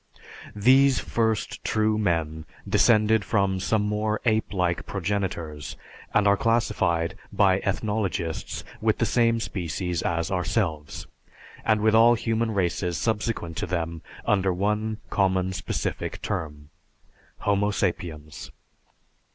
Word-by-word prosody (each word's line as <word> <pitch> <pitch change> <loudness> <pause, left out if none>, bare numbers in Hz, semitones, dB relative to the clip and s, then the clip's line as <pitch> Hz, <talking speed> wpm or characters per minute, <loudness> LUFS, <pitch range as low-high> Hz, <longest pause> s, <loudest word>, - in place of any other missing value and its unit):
These 130 +5 +5
first 110 -2 -1
"true 110 0 +1
men" 80 -5 -1 0.2
descended 110 -2 +4
from 100 -3 +1
some 105 +3 +1
more 105 +1 -1
ape 110 -1 +1
like 90 -3 -1
progenitors 85 -7 -3 0.3
and 105 -1 +3
are 100 - +6
classed 115 +2 +1 0.6
by 95 -2 +3
ethnologists 100 -5 -2 0.2
with - - +2
the - - +1
same 115 -1 +2
species 90 -4 -3
as 85 0 -1
ourselves, 90 -5 -1 0.6
and 110 -1 +2
with 110 0 +3
all 115 +2 +7
human 115 0 0
races 90 -3 -1
subsequent 105 -6 -2
to - - -2
them 85 -2 -3 0.2
under 95 -2 +2
one 105 +4 -1
common, 95 -1 +1
specific - - -3
term, 75 -2 -4 0.7
Homo 100 0 +2
Sapiens. 80 -6 -3
100 Hz, 115 wpm, -25 LUFS, 85-110 Hz, 0.7 s, all